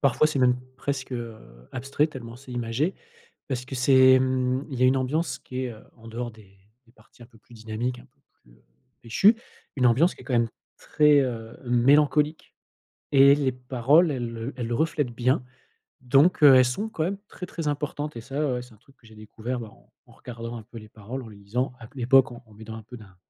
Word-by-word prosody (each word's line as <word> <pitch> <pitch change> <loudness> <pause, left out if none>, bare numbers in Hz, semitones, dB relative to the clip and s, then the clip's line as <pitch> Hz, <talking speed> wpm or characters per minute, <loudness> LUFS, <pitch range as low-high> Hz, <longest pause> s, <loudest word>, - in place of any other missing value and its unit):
Parfois 140 +2 +3
c'est 155 -2 -2
même 125 -1 +4 0.2
presque, 135 -1 -4
heu, 115 -2 -5 0.4
abstrait 135 +3 0
tellement 120 -6 -9
c'est 130 0 -12
imagé 120 +8 -1 0.5
parce 125 -2 -3
que 135 - -7
c'est, 130 0 +6
mmh, 130 0 0
il 130 -3 -5
y - - +3
a 130 - +6
une 130 - +3
ambiance 145 +6 -1
qui 130 0 -5
est, 125 - -4
heu, 110 - -14 0.2
en 115 - -13
dehors 120 +1 -5
des 105 -3 -19 0.3
des 115 - -24
parties 125 - -25
un - - -13
peu 115 -1 -22
plus 120 - -23
dynamiques, 115 +3 -4
un 120 - -14
peu 125 - -39 0.2
plus, - - -23
heu, - - -25 0.4
pêchues, 195 - +4 0.4
une 125 -2 +3
ambiance 145 +10 +3
qui - - -17
est - - -16
quand 135 - -5
même 115 -1 +2 0.3
très, 150 -1 +4
heu, 115 -4 -4
mélancolique 145 +5 +2 0.6
et 140 0 +7
les 140 -3 0
paroles 130 +6 +2
elles, 120 -3 -4
heu, 115 +5 -5
elles 120 -2 -4
reflètent 150 -2 0
bien, 125 +2 0 0.6
donc, 140 +7 +3
heu, 140 -2 +9
elles 130 0 +6
sont 200 - -2
quand 165 -7 -2
même 190 +4 -2
très, 180 - -8
très 165 -3 -5
importantes 150 0 -4
et - - -6
ça, 140 +3 -2
ouais, 125 - -3
c'est 125 -2 -14
un - - -19
truc 135 +5 -25
que 115 - -21
j'ai 110 - -16
découvert, 110 +4 -6
bah, 110 - -8
en - - -23 0.2
en - - -19
regardant 115 -1 -8
un 115 - -8
peu 115 +2 -13
les 110 -1 -10
paroles. 115 +5 -7
En 115 - -11
les 105 - -13
lisant, 120 +6 -3
à 115 - -11
q - - -27
à 130 - -8
l'époque, 130 +1 +5
en 120 +1 -11
en 110 - -20
m'aidant 110 +1 -9
un 110 - -9
peu 120 +3 -11
d'un 100 -4 -16
125 Hz, 235 wpm, -25 LUFS, 115-140 Hz, 0.6 s, heu